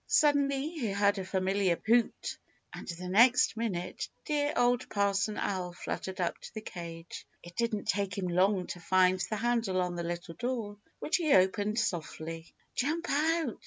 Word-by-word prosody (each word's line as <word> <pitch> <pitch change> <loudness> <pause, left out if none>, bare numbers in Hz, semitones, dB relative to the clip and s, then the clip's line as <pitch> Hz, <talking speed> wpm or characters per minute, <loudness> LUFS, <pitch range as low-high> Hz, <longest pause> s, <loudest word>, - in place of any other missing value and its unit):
Suddenly, 285 -1 +3
he 285 -10 -3
heard 200 0 +2
a - - -3
familiar 190 -1 +1
hoot, 235 +1 +1 0.3
and - - -8
the 180 +1 -5
next 235 +7 +5
minute 195 -6 -3 0.2
dear 295 -1 +1
Old 245 +1 +2
Parson 200 +1 +1
Owl 180 -3 -2
fluttered 190 +1 -5
up 175 - -1
to - - -11
the 220 - -4
cage. 170 -4 -8 0.2
It 175 0 -12
didn't 230 -3 -1
take 200 -1 0
him 190 -2 -1
long 185 +2 +2
to 175 - -6
find 185 +1 +3
the 215 - -1
handle 225 -4 0
on 180 -1 0
the 175 - -3
little 170 0 -4
door, 225 +1 -3 0.2
which 310 - 0
he 325 -4 0
opened 205 +3 +2
softly. 165 -5 -3 0.2
"Jump 320 +6 -1
out!" 315 -3 +1
200 Hz, 165 wpm, -31 LUFS, 180-240 Hz, 0.3 s, next